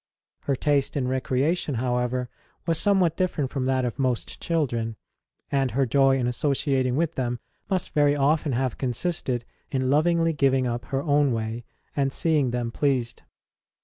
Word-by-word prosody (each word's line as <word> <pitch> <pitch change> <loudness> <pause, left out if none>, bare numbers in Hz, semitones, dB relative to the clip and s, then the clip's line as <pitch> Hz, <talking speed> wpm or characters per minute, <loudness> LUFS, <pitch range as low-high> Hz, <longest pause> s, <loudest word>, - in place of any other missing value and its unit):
Her 140 - +1
taste 145 +1 +1
in 130 -3 0
recreation, 130 +4 0
however, 125 +1 -1 0.4
was 165 -2 +1
somewhat 190 -5 +3
different 160 -8 -1
from 135 -2 -2
that 130 -1 +1
of 125 +3 -4
most 130 -3 -1
children, 120 -9 -1 0.6
and 135 -2 +2
her 135 +3 +1
joy 135 +2 +4
in 125 - 0
associating 130 0 +1
with 165 +2 0
them 120 -3 -2 0.3
must 185 -3 -1
very 145 -1 +4
often 145 0 +2
have 130 -1 -1
consisted 130 -2 -2 0.2
in 130 -1 0
lovingly 165 +2 +3
giving 135 -3 +2
up 120 0 -2
her 135 0 -2
own 145 -3 +3
way 115 +1 -3 0.3
and 135 -1 +1
seeing 150 -3 +2
them 120 -1 -2
pleased. 130 -3 0
135 Hz, 155 wpm, -25 LUFS, 125-150 Hz, 0.6 s, joy